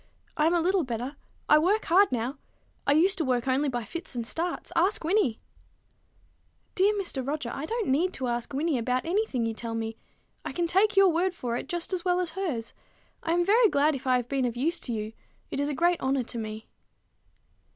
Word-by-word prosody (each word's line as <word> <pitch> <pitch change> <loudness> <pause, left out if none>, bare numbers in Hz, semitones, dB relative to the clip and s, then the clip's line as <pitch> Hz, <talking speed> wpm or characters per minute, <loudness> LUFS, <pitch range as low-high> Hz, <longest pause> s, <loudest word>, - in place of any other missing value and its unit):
I 305 0 +3
am 340 - +3
a 340 - +3
little 370 +1 +2
better. 250 +2 -4 0.3
I 300 - +6
work 395 +7 +2
hard 385 +4 +5
now. 250 +3 -2 0.5
I 280 - +5
used 370 +6 +3
to - - +2
work 250 -2 0
only 275 +3 +2
by 240 -2 -2
fits 335 - -7
and 235 -1 -2
starts. 340 +8 -3
Ask 365 +3 +2
Wynnie." 320 - +2 1.4
"Dear 390 +2 +4
Mr. 345 -9 -2
Roger, 280 -2 -3
I 295 +3 -4
don't 460 +1 -2
need 320 +8 +2
to 260 - -3
ask 240 0 -2
Wynnie 290 0 0
about 250 +3 -1
any 410 +6 +1
thing 245 - -1
you 225 - -1
tell 230 +1 -5
me. 225 0 -4 0.5
I - - -5
can 345 - 0
take 390 +5 +2
your 390 -1 +7
word 355 +2 +1
for 240 -6 -3
it - - -5
just 350 +1 -2
as 360 -2 -1
well 360 -1 +2
as 355 -3 -1
hers. 320 -11 -3 0.5
I 330 - 0
am 350 0 +2
very 440 +3 +5
glad 295 0 +3
if 270 -1 -6
I 255 - +4
have 245 -1 -3
been 270 -1 0
of 240 -1 -2
any 250 - -2
use 340 +2 0
to - - -4
you. 215 -1 -3 0.4
It - - -2
is 285 +1 0
a 290 - -2
great 345 +3 +2
honor 265 -1 +1
to 240 - -7
me." 215 0 -6
300 Hz, 225 wpm, -27 LUFS, 245-355 Hz, 1.4 s, your